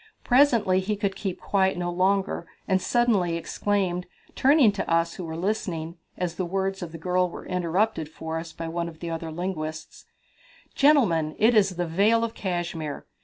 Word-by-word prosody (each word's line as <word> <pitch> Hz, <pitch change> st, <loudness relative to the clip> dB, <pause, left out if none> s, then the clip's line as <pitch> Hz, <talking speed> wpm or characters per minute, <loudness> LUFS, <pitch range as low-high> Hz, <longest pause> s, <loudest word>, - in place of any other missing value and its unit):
Presently 235 Hz, -8 st, +4 dB
he 205 Hz, +3 st, -1 dB
could 200 Hz, -1 st, -2 dB
keep 190 Hz, -3 st, -4 dB
quiet 190 Hz, -2 st, +1 dB
no 175 Hz, 0 st, -2 dB
longer, 190 Hz, +2 st, 0 dB, 0.2 s
and 190 Hz, -1 st, +2 dB
suddenly 205 Hz, -9 st, +2 dB
exclaimed, 180 Hz, 0 st, -1 dB, 0.3 s
turning 275 Hz, -4 st, +5 dB
to 200 Hz, -, -4 dB
us 165 Hz, 0 st, +2 dB
who 185 Hz, -, -7 dB
were 160 Hz, 0 st, -5 dB
listening, 170 Hz, -4 st, -2 dB, 0.2 s
as 175 Hz, -2 st, -3 dB
the 185 Hz, -, -1 dB
words 195 Hz, +2 st, -2 dB
of 170 Hz, -2 st, -5 dB
the 165 Hz, -, -7 dB
girl 180 Hz, +2 st, +1 dB
were -, -, -9 dB
interpreted 180 Hz, -1 st, 0 dB
for 160 Hz, +1 st, -5 dB
us 165 Hz, 0 st, -8 dB
by 165 Hz, -, -6 dB
one 170 Hz, +1 st, -3 dB
of 160 Hz, -1 st, -14 dB
the 170 Hz, 0 st, -5 dB
other 165 Hz, 0 st, -4 dB
linguists: 160 Hz, -2 st, -5 dB, 0.7 s
"Gentlemen, 195 Hz, -, +3 dB
it 225 Hz, +3 st, +4 dB
is 195 Hz, -4 st, +3 dB
the 175 Hz, 0 st, -1 dB
Vale 205 Hz, +8 st, +3 dB
of 230 Hz, -1 st, -2 dB
Cashmere! 175 Hz, -5 st, -4 dB
180 Hz, 175 wpm, -26 LUFS, 165-205 Hz, 0.7 s, turning